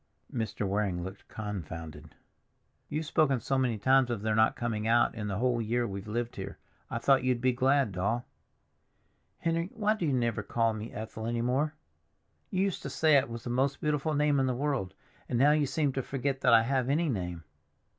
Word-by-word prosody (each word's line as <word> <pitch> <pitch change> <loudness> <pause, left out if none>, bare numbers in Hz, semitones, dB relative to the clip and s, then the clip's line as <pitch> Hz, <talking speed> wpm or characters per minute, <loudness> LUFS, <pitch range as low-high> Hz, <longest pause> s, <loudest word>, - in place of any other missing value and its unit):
Mr. 110 -4 -2
Waring 95 -3 -1
looked 95 +2 -9
confounded. 80 -7 -7 0.7
"You've 155 +2 -2
spoken 150 -4 +2
so 135 - -1
many 125 -4 +1
times 130 +4 +4
of 115 -4 -3
their 110 0 +1
not 110 +1 +4
coming 110 -2 -2
out 120 +1 +4
in 105 -2 -4
the 100 -1 -2
whole 120 0 +1
year 120 +2 0
we've 100 -1 -6
lived 120 +2 -3
here, - - -6 0.3
I - - -2
thought 135 +2 +3
you'd 125 -2 +1
be 130 +1 +3
glad, 130 -1 +2
Doll." 100 +7 -1 1.1
"Henry, 165 +1 -1
why 215 -1 +2
do 185 -7 -2
you 140 - +1
never 120 -3 0
call 115 -1 +1
me 110 +1 -6
Ethel 110 +1 -6
any 120 0 -1
more? 140 +5 0 0.7
You 185 0 +1
used 195 -3 -1
to - - -5
say 155 -2 +3
it 135 -2 +3
was 115 -1 -6
the 120 - -4
most 135 +3 +1
beautiful 150 0 0
name 145 -1 +3
in 135 - +2
the 125 - 0
world, 135 -8 -2 0.3
and 120 - 0
now 140 +4 +5
you 150 -1 +2
seem 145 -1 0
to 135 - -1
forget 135 +1 -2
that 125 - +4
I 115 -1 +7
have 130 +1 0
any 160 +4 +2
name. 90 - -3
120 Hz, 205 wpm, -30 LUFS, 110-140 Hz, 1.1 s, I